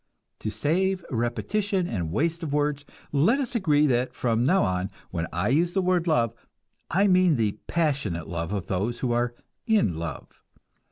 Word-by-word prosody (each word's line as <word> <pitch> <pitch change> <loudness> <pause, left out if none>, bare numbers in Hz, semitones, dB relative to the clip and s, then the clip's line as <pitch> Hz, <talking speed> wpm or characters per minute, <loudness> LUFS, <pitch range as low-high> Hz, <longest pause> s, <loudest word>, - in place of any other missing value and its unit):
To 110 - -3
save 170 - 0
repetition 185 - 0
and 85 - -3
waste 165 - 0
of 160 -4 -4
words, 145 -1 0 0.3
let 170 - +3
us 260 -4 -3
agree 155 -10 +3
that 125 -2 +1
from 115 -1 +1
now 185 +9 +4
on 95 0 -1 0.2
when 85 -2 -2
I 90 +5 0
use 170 +6 +2
the 195 - +2
word 180 -1 +1
love, 120 -8 +2 0.6
I 195 +4 +3
mean 185 -4 +4
the 105 -3 0
passionate 140 - -1
love 85 +1 -3
of 100 -3 -2
those 105 +6 -2
who 125 - 0
are 120 0 0 0.3
"in 205 - +2
love." 80 -4 -7
140 Hz, 170 wpm, -26 LUFS, 105-175 Hz, 0.6 s, now